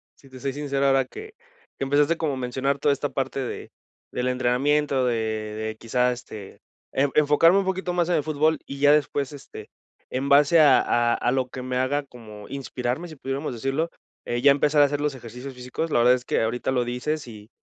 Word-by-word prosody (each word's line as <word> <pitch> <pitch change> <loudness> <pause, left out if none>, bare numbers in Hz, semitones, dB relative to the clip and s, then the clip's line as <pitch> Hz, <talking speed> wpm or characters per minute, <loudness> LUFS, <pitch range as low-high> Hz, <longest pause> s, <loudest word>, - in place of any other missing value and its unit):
si 135 - -20
te 130 -1 -12
soy 135 +1 -3
sincero 140 -1 -1
ahora 135 -1 +3
que 435 - -10 0.5
que - - -1
empezaste 145 +4 +2
como 155 -4 -1
a - - -4
mencionar 130 +2 -1
toda 145 - +2
esta 145 +1 -3
parte 135 0 -3
de 130 - -5 0.4
del 125 0 -2
entrenamiento, 130 +2 +1
de 125 - +1
de 110 -1 -3
quizá, 125 +2 +1
este, 110 -5 -9 0.3
e 140 +2 +2
enfocarme 150 +5 +5
un 195 - -1
poquito 190 -1 -2
más 175 -1 0
en 175 - +2
el 150 - +1
fútbol 155 +1 +1
y 140 - -8
ya 145 +1 +5
después, 145 -2 +1
este, 140 - -11 0.4
en 130 +2 -2
base 145 +3 +6
a 145 -4 +7
a 120 0 +2
a 120 - 0
lo 130 -1 0
que 130 - -7
me 125 0 -3
haga 135 +3 0
como 110 -6 -12
inspirarme, 135 +3 -4
si 160 - -11
pudiéramos 135 +1 -4
decirlo, 135 +7 -2 0.4
eh, 120 0 -2
ya 140 +2 +7
empezar 145 +1 +3
a - - +7
hacer 145 +1 -2
los 150 -1 0
ejercicios 125 +2 -9
físicos, 125 +6 -5
la - - +3
verdad 125 +1 +5
es 125 0 -7
que - - 0
ahorita 120 +3 -1
lo 125 -2 +1
dices 125 +5 -3
y 105 -2 -12
135 Hz, 215 wpm, -24 LUFS, 125-145 Hz, 0.5 s, a